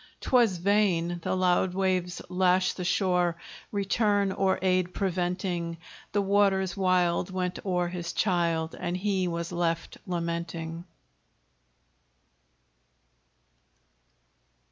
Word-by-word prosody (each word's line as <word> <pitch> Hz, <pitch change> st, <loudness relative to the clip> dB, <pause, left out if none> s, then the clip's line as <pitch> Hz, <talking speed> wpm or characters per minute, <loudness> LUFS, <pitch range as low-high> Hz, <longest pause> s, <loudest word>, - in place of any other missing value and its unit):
'Twas 235 Hz, -8 st, +3 dB
vain: 175 Hz, -3 st, +1 dB
the -, -, -1 dB
loud 185 Hz, 0 st, +2 dB
waves 185 Hz, -2 st, 0 dB
lashed 185 Hz, 0 st, +2 dB
the 180 Hz, -, -4 dB
shore, 180 Hz, -2 st, +1 dB, 0.3 s
Return 205 Hz, 0 st, +1 dB
or 190 Hz, 0 st, +1 dB
aid 185 Hz, -1 st, +1 dB
preventing: 180 Hz, -2 st, -2 dB, 0.3 s
The 205 Hz, -1 st, +1 dB
waters 195 Hz, -2 st, +2 dB
wild 185 Hz, -2 st, +2 dB
went 180 Hz, -1 st, -2 dB
o'er 180 Hz, -2 st, 0 dB
his 175 Hz, -1 st, -4 dB
child, 170 Hz, -5 st, 0 dB
And 175 Hz, +1 st, -2 dB
he 190 Hz, -1 st, 0 dB
was 170 Hz, 0 st, -3 dB
left 170 Hz, -1 st, -2 dB
lamenting. 170 Hz, -1 st, -4 dB
180 Hz, 100 wpm, -28 LUFS, 175-190 Hz, 0.3 s, Twas